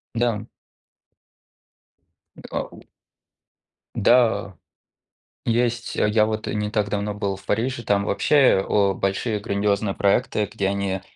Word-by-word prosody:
Да. 115 -3 0 2.0
Т - - -11
а - - -1 0.2
у. - - -14 1.1
Да, 110 -4 +3 0.9
есть. 120 +1 0
А - - +3
я 105 0 +3
вот 110 0 -3
не 105 0 -2
так 105 -1 0
давно 105 0 -2
был 100 -2 -2
в 95 - -17
Париже, 120 +3 -1
там 100 -1 +1
вообще 130 -6 +3
о 100 -1 +2
большие 100 +4 -1
грандиозные 100 -1 0
проекты, 105 0 +1
где 100 -3 -1
они 100 -1 -2
105 Hz, 125 wpm, -23 LUFS, 100-115 Hz, 2.0 s, Да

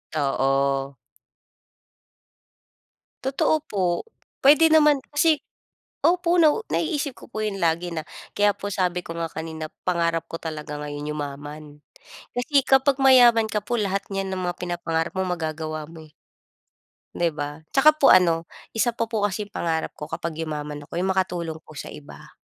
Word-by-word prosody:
Oo. 135 -1 +1 2.3
Totoo 270 +3 +2
po. 180 -4 -1 0.4
Puwede 310 +3 +7
naman 300 -3 +5
kasi 300 +1 +3 0.6
opo, 350 0 +3
nau 320 +8 +4
naiisip 295 -4 -1
ko - - -14
po 215 - -4
'yon 195 -2 -3
lagi 170 +1 0
na 160 - -2 0.3
Kaya 205 0 +3
po 205 -1 -4
sabi 180 -1 -1
ko 165 - -6
nga 165 -1 -3
kanina 160 0 -6 0.2
pangarap 170 -2 0
ko 165 - -7
talaga 150 -2 -5
ngayon 145 0 -5
yumaman. 145 +1 -6 0.7
Kasi 270 +3 +2
kapag 270 +1 +4
mayaman 240 -4 +6
ka 210 - +1
po 240 +4 -3
lahat 200 -3 -1
niyan 195 -1 -3
na 190 - -3
mga 175 -1 -2
pinapangarap 170 -2 -2
mo 190 - 0
magagawa 155 -2 -3
mo, 160 -2 -12
eh. - - -25 1.0
'Di 170 -1 +2
ba? 145 +1 -6
'Tsaka 300 +3 +6
po 290 - +5
ano, 165 -2 +5 0.3
isa 240 +2 +2
pa 230 -1 -2
po 220 -3 -2
kasi 205 +1 -1
'yong 205 - -31
pangarap 165 -1 -1
ko 150 +1 -8
kapag 165 0 -4
yumaman 150 -2 -4
ako, 165 +3 -5
'yong 190 +1 +1
makatulong 175 -4 -2
po - - -16
sa - - -6
iba. 145 - -12
175 Hz, 160 wpm, -24 LUFS, 155-230 Hz, 2.3 s, Puwede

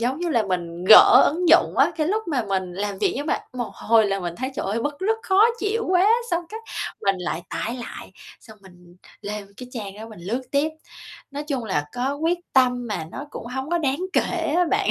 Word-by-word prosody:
giống 250 +4 -1
như 350 - -1
là, 235 -8 +2
mình 175 -2 -4
gỡ 220 +5 +9
ứng 350 +2 -1
dụng - - +5
á, - - +4
cái 310 - 0
lúc 430 +3 0
mà 265 -6 0
mình 185 -2 -2
làm 200 +1 -4
việc - - +1
nhưng 285 +2 -4
mà - - +1 0.2
một 245 -2 -3
hồi 225 -1 +3
là 195 -1 -1
mình 175 -2 -4
thấy 260 +2 -3
trời - - -3
ơi 210 +4 -1
bứt 290 +1 -3
rứt, 435 +4 +1
khó 385 +2 +4 0.2
chịu 440 +2 -1
quá, 370 +2 +4 0.2
xong, 345 0 0
cái, 440 +3 -7 0.4
mình 195 -1 +2
lại 170 -1 -3
tải 230 +3 -3
lại, 240 - -9 0.3
xong 220 -3 -15
mình 180 -2 -18 0.2
lên 205 0 -6
cái 250 +1 -9
trang 205 -5 -6
đó 220 +2 -9
mình 215 -5 -12
lướt 230 +9 -3
tiếp. 285 +2 +2 0.6
Nói 290 +1 -5
chung 275 -5 -3
là, 190 -8 -1
có 255 +3 -1
quyết 330 +4 0
tâm 250 -2 +3
mà 210 -7 -3
nó 285 - -6
cũng - - -8
hông 265 +4 -5
có 345 - +2
đáng 280 -2 -1
kể 330 -4 0
á 360 - +4
bạn. 405 0 +2
250 Hz, 235 wpm, -23 LUFS, 200-315 Hz, 0.6 s, gỡ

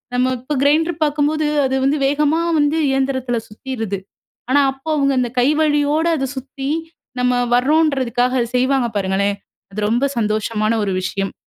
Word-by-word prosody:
நம்ம 250 +1 +2
இப்ப 260 +4 -4
கிரைண்ட்ரு 320 +4 +2
பார்க்கும்போது, 300 +1 0 0.2
அது 265 0 0
வந்து 285 +2 +1
வேகமா 300 +3 +1 0.2
வந்து 290 +2 +2
இயந்திரத்தில 260 -3 0
சுத்திருது. 220 -3 -5 0.5
ஆனா, 285 +2 +5
அப்போ 270 +4 -12
அவுங்க 275 -1 +2
அந்த 245 -1 -1
கை 250 - +3
வலியோட 295 +1 +1
அத 270 0 -2
சுத்தி, 270 +1 -6 0.5
நம்ம 250 0 +2 0.2
வர்றோன்றதுக்காக, 255 -3 +2
அத 235 - -1
செய்வாங்க 260 -1 +2
பாருங்களேன்! 200 +1 0 0.4
அது 210 - -4
ரொம்ப 240 +5 +1
சந்தோஷமான 215 0 0
ஒரு 195 - -1
விஷயம். 195 +1 -3
265 Hz, 145 wpm, -19 LUFS, 235-290 Hz, 0.5 s, ஆனா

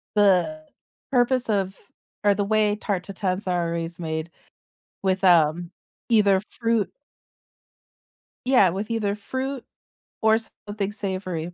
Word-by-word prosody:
the 205 - +3 0.5
purpose 250 -1 +2
of 195 -2 0 0.5
or 205 -1 +4
the 205 - 0
way 210 0 +2
tarte 200 -4 -2
tatin's 185 0 -2
are 175 -2 +1
always 170 +1 -4
made 160 0 -3 0.7
with, 190 0 +1
um, 170 0 +4 0.4
either 200 -4 +4
fruit 230 -3 0 1.6
Yeah, 245 -9 +5
with 200 +5 -4
either 210 -3 0
fruit, 260 +5 -4 0.6
or 220 0 +5 0.3
something 205 -1 -2
savory. 185 -4 -4
200 Hz, 115 wpm, -24 LUFS, 180-220 Hz, 1.6 s, Yeah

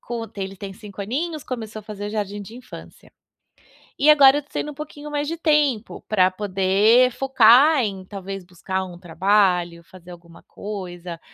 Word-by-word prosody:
Com 235 -1 -5
ele 195 0 -5
tem 195 0 -8
5 200 0 -9
aninhos, 305 - -3
começou 220 -3 -6
a - - -19
fazer 205 0 -7
jardim 205 -1 -4
de 210 +3 -10
infância. 250 +1 -13 0.9
E 285 - +1
agora 280 -1 +7
eu 295 - -3
tô 290 - -32
tendo - - -3
um 295 - -7
pouquinho 300 0 -9
mais 290 0 -2
de 330 - -3
tempo, 300 -8 0
pra 185 -4 +3
poder 200 +5 +3
focar 265 +3 +5
em 195 -3 -4
talvez 195 -1 -7
buscar 185 +1 -4
um 175 -1 -11
trabalho, 180 -1 +1
fazer 180 0 -15
alguma 170 -1 -15
coisa, 180 -4 -8
205 Hz, 170 wpm, -22 LUFS, 185-260 Hz, 0.9 s, agora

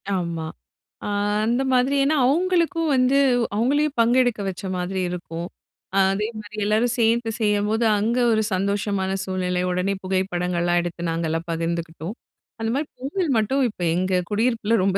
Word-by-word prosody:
ஆமா. 170 -4 -2 0.6
அ - - -3 0.4
அந்த 240 +3 +1
மாதிரி, 255 +2 +3
ஏன்னா, 295 +3 +2
அவங்களுக்கும் 335 +2 +1
வந்து 255 +1 +3 0.4
அவங்களையும் 285 +6 +1
பங்கெடுக்க 240 -1 +3
வச்ச 185 0 -7
மாதிரி 180 +1 -2
இருக்கும். 170 -1 -5 0.5
அ, - - +2 0.2
அதே 210 +2 -1
மாரி 215 0 -12
எல்லாரும் 220 +3 +2
சேர்ந்து 230 0 +2
செய்யும்போது 210 +1 +1
அங்க 230 +4 0
ஒரு 220 -1 +3
சந்தோஷமான 200 0 -1
சூழ்நிலை 185 -1 -1
உடனே 180 +2 0
புகைப்படங்கள்லாம் 180 -2 0
எடுத்து 175 0 -4
நாங்கலாம் 165 0 -2
பகிர்ந்துக்கிட்டோம். 165 +2 -3 0.5
அந்த 225 - -1
மாரி 295 +2 -1
பொங்கல் 295 +5 -2
மட்டும் 265 +6 +1
இப்ப 205 - -12
எங்க 185 0 +1
குடியிருப்புல 225 0 +1
ரொம்ப 195 0 +2
205 Hz, 140 wpm, -23 LUFS, 180-245 Hz, 0.6 s, மாதிரி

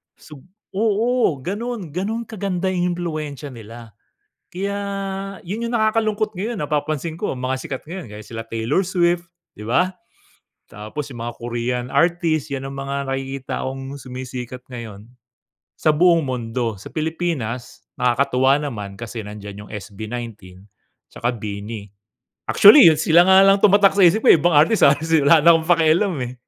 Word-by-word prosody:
Sub 150 -2 -14 0.3
oo, 225 +2 +1
ganun 205 - -4
ganun 200 +8 -3
kaganda 195 -4 -3
yung 180 -1 0
impluwensya 155 -4 -5
nila, 115 0 -11 0.6
kaya 200 +3 -3 0.7
yun 210 +7 -5
yung 235 - -4
nakakalungkot 215 -2 0
ngayon, 215 +3 -3
napapansin 150 +2 -2
ko 210 - -2
ang 125 - -8
mga 130 +1 -1
sikat 135 - -5
ngayon, 180 +1 -6
gaya 105 - -8
sila 115 +1 -8
Taylor 115 +11 -1
Swift, 175 -1 +1 0.3
di 105 - -9
ba? 180 +11 +2 0.8
Tapos 110 +9 -7
yung 120 -3 -7
mga 120 - -4
Korean 120 +1 -3
artist, 160 -1 +1
'yan 135 0 -4
ang 135 - -8
mga 140 0 -4
nakikita 135 0 -4
kong 135 +1 -6
sumisikat 125 -1 -7
ngayon, 115 -4 -9 0.7
sa 155 -1 +2
buong 170 +1 +4
mundo. 120 -2 -3
Sa 95 - -11
Pilipinas, 155 -7 -4 0.2
nakakatuwa 130 +2 +2
naman, 105 -9 -5
kasi 115 -1 -6
nandiyan 105 0 -9
yung - - -18
SB19 105 -2 -8 0.5
tsaka 120 - -1
BINI. 105 -1 -6 0.7
Actually, 215 - +9
sila 170 +2 +5
nga 190 0 +7
lang 195 0 +5
tumatak 200 -1 +5
sa 200 - +4
isip 180 +6 +4
ko, - - +10
eh, - - +6
ibang 175 +4 +2
artist, 160 +9 +4
ah, - - +6
si 160 0 +2
wala 155 +3 +6
na 170 0 +7
akong 160 0 -2
pakialam, 170 +3 +3
eh. 125 0 -6
145 Hz, 155 wpm, -21 LUFS, 120-180 Hz, 0.8 s, ko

